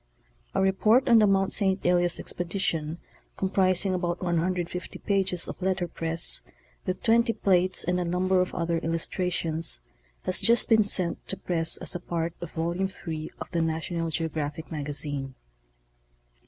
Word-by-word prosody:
— - - -33
A - - +2
report 215 +7 +3
on 235 -2 +7
the 210 - +5
Mt. 195 -1 +2
St. 190 -1 +1
Elias 175 -1 +3
expedition, 170 -3 -2 0.4
comprising 190 0 +1
about 175 -1 -1
150 180 0 -2
pages 190 -3 0
of - - -8
letter 185 -1 0
press 165 0 -2 0.5
with 185 0 -3
20 230 +1 +4
plates 185 -2 +3
and 180 +1 0
a - - 0
number 180 +2 +1
of 185 - -1
other 170 -1 0
illus 165 0 -1
trations, 170 -3 0 0.4
has 185 - +1
just 235 0 +3
been 220 -2 +6
sent 180 -4 +3
to 195 - -2
press 165 -2 +2
as - - -1
a 175 - -3
part 170 -1 -3
of 175 - -5
Volume 170 +4 -1 0.2
III 155 -1 -4
of - - -7
the 170 -2 0
National 165 +1 -2
Geographic 160 -1 -3
Magazine. 145 -3 -4
175 Hz, 155 wpm, -27 LUFS, 165-190 Hz, 0.5 s, on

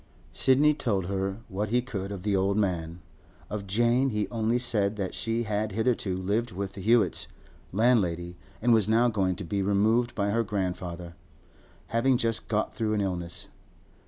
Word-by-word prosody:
Sidney 145 +3 +4
told 110 - -1
her 95 +2 -2
what 105 0 -3
he 120 +3 +3
could 100 -6 -5
of 95 -3 -6
the 105 -1 +1
old 95 +1 +1
man. 85 -4 -1 0.5
Of 100 -1 -4
Jane 120 +6 +2
he 105 -4 -1
only 115 +1 0
said 110 -4 0
that 100 -3 -3
she 115 0 -1
had 105 -1 -2
hitherto 110 -4 0
lived 105 +5 -1
with 95 +1 -4
the 100 - -8
Hewetts' 115 +3 +3 0.4
landlady, 90 -6 +1 0.3
and 120 0 +5
was 110 -2 +3
now 115 +2 +4
going 95 -5 0
to 100 - -6
be 100 +3 -2
removed 110 +5 +2
by 100 -2 0
her 115 +2 +2
grandfather, 90 -4 -4 0.8
having 125 +3 +3
just 115 -2 0
got 110 -1 -1
through 110 -2 -1
an 105 - +1
illness. 90 -3 -3
105 Hz, 170 wpm, -27 LUFS, 95-115 Hz, 0.8 s, and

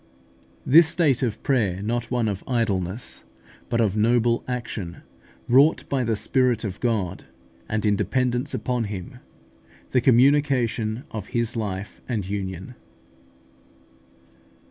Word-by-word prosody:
THIS 160 +4 +7
STATE 155 -7 +2
OF 115 -4 -2
PRAYER 100 -9 +1
NOT 115 +2 -2
ONE 120 -3 0
OF 100 -2 -3
IDLENESS, 110 -4 -1 0.5
BUT 115 -1 +1
OF 105 -3 +1
NOBLE 115 +2 +2
ACTION, 115 -8 -5 0.4
WROUGHT 140 +6 +4
BY 135 -2 0
THE 115 -1 +1
SPIRIT 125 +2 +1
OF 100 -4 -5
GOD, 105 -7 -1 0.4
AND 110 0 -1
IN 105 -1 +3
DEPENDENCE 125 +6 0
UPON 125 -2 -1
HIM 100 -4 -7 0.7
THE 125 - +3
COMMUNICATION 125 -3 +3
OF 110 -3 -6
HIS 120 0 -1
LIFE 100 -3 -4
AND 105 -6 -2
UNION. 95 +1 -5
115 Hz, 120 wpm, -24 LUFS, 105-125 Hz, 0.7 s, THIS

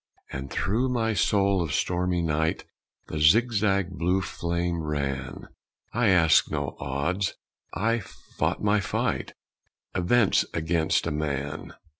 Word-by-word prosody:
And 65 +1 -5
through 115 - 0
my 115 -3 0
soul 100 -2 +2
of 80 -2 -2
stormy 90 -1 0
night 80 0 0 0.5
The 75 - -3
zigzag 100 +2 +3
blue 90 +3 +2
flame 85 -1 -2
ran. 70 -3 -4 0.4
I 120 0 +2
asked 85 -5 +5
no - - -3
odds 70 +8 -1 0.4
I 115 +3 +1
fought 100 - -4
my 105 0 +3
fight 85 - -2 0.6
Events 95 +4 +3
against 80 0 +1
a 85 - -1
man. 75 -2 -3
85 Hz, 120 wpm, -26 LUFS, 75-100 Hz, 0.6 s, asked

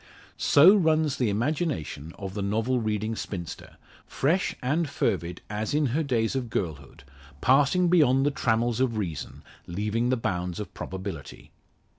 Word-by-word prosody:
So 165 +8 +7
runs 155 -6 +2
the 125 -4 +1
imagination 105 - -2
of 95 -2 -6
the 105 - -3
novel 110 +6 0
reading 110 0 -2
spinster, 85 -6 -7 0.3
fresh 165 +7 0
and 150 +5 0
fervid 85 -6 -1
as 110 +6 -3
in 150 0 +2
her 160 - +1
days 120 -5 0
of 125 -3 -2
girlhood 75 - -4 0.4
passing 145 - +4
beyond 140 -6 +4
the 145 - +2
trammels 120 -2 0
of 125 -4 +1
reason 85 -8 -5 0.2
leaving 105 +6 -1
the 130 - +2
bounds 90 -4 -2
of 100 -4 -6
probability. 95 -7 -7
115 Hz, 145 wpm, -26 LUFS, 100-140 Hz, 0.4 s, So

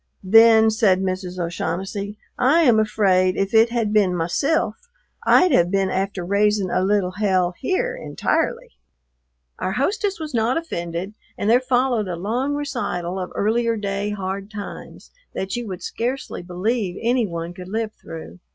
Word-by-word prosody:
"Then," 225 +2 +6
said 210 -4 +3
Mrs. 185 -1 -3
O'Shaughnessy, 190 +4 -3 0.2
"I 280 +7 +4
am 240 -8 +5
afraid 190 -4 +2
if 195 +1 -1
it 225 +1 +6
had 230 -3 -1
been 195 -4 +3
mysilf 215 - 0 0.5
I'd 365 -1 +6
have 175 -9 +4
been 195 0 +1
after 190 -1 -2
raising 200 0 +1
a - - +1
little 195 -2 +1
hell 185 -3 +1
here 485 - -1
intirely." - - -2 0.9
Our 185 - -2
hostess 390 - -1
was 310 -3 -6
not 230 +3 +1
offended, 175 - -4 0.2
and 205 - -2
there 245 - +6
followed 250 -4 +1
a 180 - -3
long 240 +11 -1
recital 190 -11 -3
of 180 - -5
earlier 230 +2 +1
day 200 0 -2
hard 195 -1 -4
times 205 -1 -9 0.2
that 190 0 -3
you 240 -1 -4
would 185 -3 -6
scarcely 250 -1 -3
believe 185 +2 -2
any 240 -1 +2
one 170 -1 -5
could 180 0 -10
live 220 +1 -2
through. 165 +2 -10
205 Hz, 155 wpm, -22 LUFS, 185-240 Hz, 0.9 s, Then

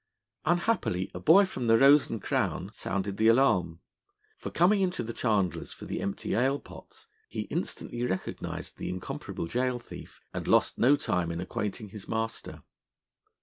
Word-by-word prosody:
Unhappily, 175 - +1
a 90 - -5
boy 170 - +6
from 125 -10 -4
the 115 0 +6
'Rose 140 +3 +6
and 115 -3 -5
Crown' - - -1
sounded 100 +2 -3
the 110 - +3
alarm; 95 -9 +3 0.5
for - - -6
coming 190 +5 +3
into 185 -1 0
the 115 +1 -5
chandler's 105 -7 0
for - - -10
the - - -4
empty 100 - -3
ale 135 +4 +2
pots, - - -14 0.2
he - - -3
instantly 120 0 -3
recognised 95 -6 -4
the - - -4
incomparable 90 -2 -5
gaol 125 +7 0
thief, 120 - -11
and - - -4
lost - - +3
no 135 +5 +6
time 90 - -1
in 85 - -4
acquainting 105 +3 -4
his 100 0 -10
master. 110 0 -4
115 Hz, 160 wpm, -29 LUFS, 95-140 Hz, 0.5 s, boy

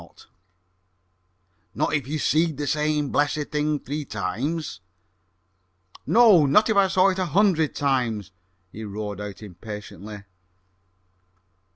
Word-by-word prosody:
"Not - - 0
if 145 -5 -1
you 155 +2 -2
seed 155 0 +1
the 145 - -3
same 150 -1 0
blessed 145 0 0
thing 150 0 0
three 145 +4 -5
times?" 115 - -4 1.3
"No; 215 -10 +6
not 210 +11 +4
if - - +1
I 200 -1 +5
saw 190 +1 +4
it 190 0 -2
a 185 - 0
hundred 175 -5 +2
times!" 120 -8 -1 0.4
he 110 - -8
roared 105 -1 -5
out 105 +1 -8
impatiently. 105 +1 -9
145 Hz, 115 wpm, -24 LUFS, 105-160 Hz, 1.3 s, No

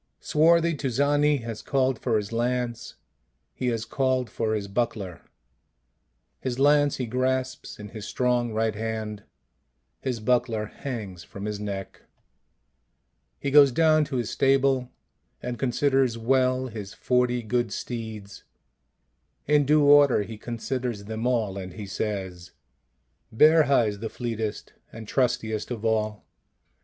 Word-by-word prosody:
Swarthy 170 +2 +3
Tuzani 145 +1 +1
has 115 -2 -6
called 130 -3 0
for 115 -3 +1
his 105 0 -4
lance, 120 0 -2 0.6
he 125 - -3
has 115 -2 -1
called 130 -1 0
for 110 -2 -1
his 100 -2 -3
buckler; 100 -5 -3 1.2
his 125 -2 -3
lance 145 +1 +4
he 125 - -3
grasps 130 +2 -2
in 105 0 -9
his 110 0 -8
strong 125 -2 0
right 110 0 0
hand; 110 -1 -4 0.8
his 125 -3 -3
buckler 115 -1 +1
hangs 105 -7 -7
from 100 +1 -8
his 105 -1 -3
neck. 100 -2 -6 1.4
He 140 - -2
goes 140 -1 +7
down 155 +2 +4
to 140 - -5
his 120 -3 -2
stable, 135 -2 +2 0.5
and 120 -1 -5
con 130 0 0
siders 135 -2 +2
well 130 +2 +2
his 105 -5 -7
forty 125 -1 +1
good 120 0 -1
steeds; 110 -3 -6 1.0
in 145 -1 +3
due 150 0 +5
order 145 -6 +6
he 110 +2 -8
considers 120 0 -4
them 110 +3 -3
all, 110 -6 0
and 90 -1 -7
he 105 - -7
says: 95 -3 -4 0.4
" 65 - -47
Berja 150 -5 +5
is 105 -1 -4
the 110 +1 -4
fleetest 115 -3 -4 0.2
and 110 -1 -9
trustiest 110 -4 0
of 115 -3 -5
all. 110 -1 0
120 Hz, 135 wpm, -26 LUFS, 110-130 Hz, 1.4 s, goes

